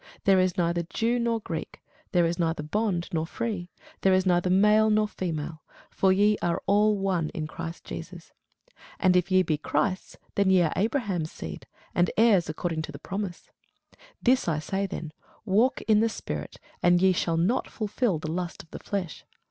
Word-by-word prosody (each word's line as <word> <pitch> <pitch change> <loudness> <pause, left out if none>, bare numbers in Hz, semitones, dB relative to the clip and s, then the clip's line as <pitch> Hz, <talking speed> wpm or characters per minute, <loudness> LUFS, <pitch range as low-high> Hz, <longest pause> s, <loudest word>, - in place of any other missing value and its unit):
There 195 -1 +5
is 185 -1 +1
neither 170 -1 +1
Jew 230 +8 -1
nor 230 -1 0
Greek, 160 -5 -6 0.3
there 175 -2 +3
is 170 +2 -1
neither 165 -2 0
bond 180 +1 -1
nor 160 -1 -1
free, 195 -4 -4 0.3
there 190 -1 +4
is 185 0 +2
neither 180 0 +2
male 210 +3 +5
nor 215 0 +3
female: 160 -5 -4 0.3
for 190 - +3
ye 205 +2 +3
are 170 -1 0
all 210 +1 +3
one 185 -5 0
in 155 - -2
Christ 165 +2 -7
Jesus. - - -9 0.7
And 185 -1 +4
if 180 +1 +2
ye 185 0 +4
be 155 -4 -1
Christ's, 185 +4 -1 0.2
then 200 -1 +2
are - - +4
ye 180 -3 +5
Abraham's 195 - -1
seed, 80 -2 -8 0.3
and 175 0 +2
heirs 210 -7 +4
according 160 +1 -2
to 155 - -6
the 140 - -8
promise. 190 +3 -6 0.7
This 255 -3 +3
I 160 -3 +1
say 195 +6 -2
then, 160 -4 -6 0.3
Walk 225 +6 +2
in 215 -2 +4
the 225 +1 +3
Spirit, - - -6 0.2
and 175 0 +4
ye 190 +1 +5
shall 165 -1 0
not 190 +10 +1
fulfil 215 -2 -1
the 155 +1 -5
lust 175 0 -4
of 165 - -25
the - - -7
flesh. 190 -5 -4
185 Hz, 185 wpm, -27 LUFS, 170-210 Hz, 0.7 s, There